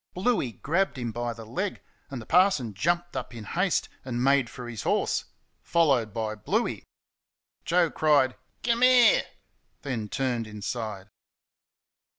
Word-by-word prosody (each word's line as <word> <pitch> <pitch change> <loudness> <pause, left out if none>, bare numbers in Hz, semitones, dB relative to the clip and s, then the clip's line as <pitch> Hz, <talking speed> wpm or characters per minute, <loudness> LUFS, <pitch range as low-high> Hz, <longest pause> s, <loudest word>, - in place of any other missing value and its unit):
Bluey 185 - 0
grabbed 170 - 0
him 120 -2 -3
by 120 +1 -3
the 115 -1 -9
leg, 185 - -3 0.3
and 135 - -5
the 115 - -9
parson 170 - +3
jumped 175 - -1
up 120 - -5
in 115 - -7
haste 180 - 0 0.2
and 120 -1 -2
made 135 -3 +3
for 125 0 -8
his 115 -3 -6
horse - - 0 0.4
followed 135 -10 +2
by 110 0 -2
Bluey. 105 - -2 0.8
Joe 170 -1 +3
cried, 145 -4 +3 0.3
"KUM 235 0 +1
'ere!" 255 - +6 0.6
then 120 -7 -3
turned 120 -3 -1
inside. 105 -1 -5
130 Hz, 140 wpm, -27 LUFS, 115-175 Hz, 0.8 s, ere